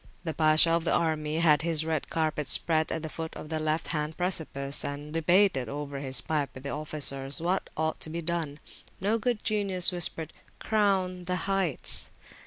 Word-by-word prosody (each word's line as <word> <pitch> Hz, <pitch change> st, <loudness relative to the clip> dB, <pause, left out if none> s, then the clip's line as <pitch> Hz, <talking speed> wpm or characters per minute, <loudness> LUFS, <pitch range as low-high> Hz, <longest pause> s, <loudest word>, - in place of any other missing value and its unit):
The 160 Hz, -2 st, -3 dB
Pasha 155 Hz, +1 st, +5 dB
of 165 Hz, 0 st, +1 dB
the 165 Hz, -, +1 dB
army 155 Hz, -2 st, 0 dB
had 150 Hz, -4 st, +5 dB
his 160 Hz, -1 st, +1 dB, 0.2 s
carpet 155 Hz, -3 st, -1 dB
spread 160 Hz, +4 st, +1 dB
at 160 Hz, -, -3 dB
the -, -, -3 dB
foot 160 Hz, +1 st, -6 dB
of 150 Hz, -, -9 dB
the 160 Hz, -1 st, -2 dB
left 155 Hz, +1 st, -1 dB
hand 150 Hz, 0 st, -2 dB
precipice, 150 Hz, -6 st, -1 dB
and 145 Hz, +2 st, -6 dB
debated 165 Hz, -4 st, +2 dB
over 145 Hz, -1 st, -5 dB
his 135 Hz, -1 st, 0 dB
pipe 150 Hz, -4 st, -1 dB
with 130 Hz, -, -10 dB
the 140 Hz, -, -4 dB
officers 145 Hz, -2 st, -2 dB
what 180 Hz, +3 st, -1 dB
ought 160 Hz, 0 st, -1 dB
to -, -, -6 dB
be 170 Hz, +1 st, -5 dB
done. 160 Hz, -3 st, -3 dB, 0.4 s
No 210 Hz, +4 st, 0 dB
good 240 Hz, -1 st, -1 dB
genius 200 Hz, -5 st, +6 dB
whispered 165 Hz, -2 st, -3 dB, 0.2 s
Crown 190 Hz, -4 st, 0 dB
the 180 Hz, +1 st, -1 dB
heights. 195 Hz, -7 st, 0 dB
160 Hz, 180 wpm, -28 LUFS, 150-175 Hz, 0.4 s, genius